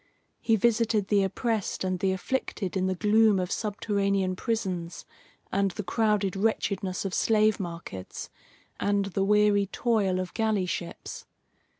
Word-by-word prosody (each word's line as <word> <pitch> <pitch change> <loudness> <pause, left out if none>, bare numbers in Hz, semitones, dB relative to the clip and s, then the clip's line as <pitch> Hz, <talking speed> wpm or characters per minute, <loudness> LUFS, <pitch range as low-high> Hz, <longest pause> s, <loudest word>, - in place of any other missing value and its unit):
He 225 - +2
visited 220 -2 +2
the 205 -1 +4
oppressed 215 +2 -1
and 185 -1 -1
the 190 0 +1
afflicted 190 -1 -3
in 185 0 +1
the 190 - 0
gloom 215 +1 +4
of 180 -1 -2
subterranean 200 -3 0
prisons, 185 -6 -3 0.5
and 195 0 +2
the 210 +3 -5
crowded 210 -1 +1
wretchedness 195 -2 -1
of 190 - -3
slave 215 -1 +3
markets, 170 - -7 0.5
and 200 -1 +1
the 195 0 -1
weary 205 0 +3
toil 200 -4 +1
of 185 -1 -4
galley 220 -4 +1
ships. 175 -1 -6
200 Hz, 135 wpm, -27 LUFS, 185-215 Hz, 0.5 s, the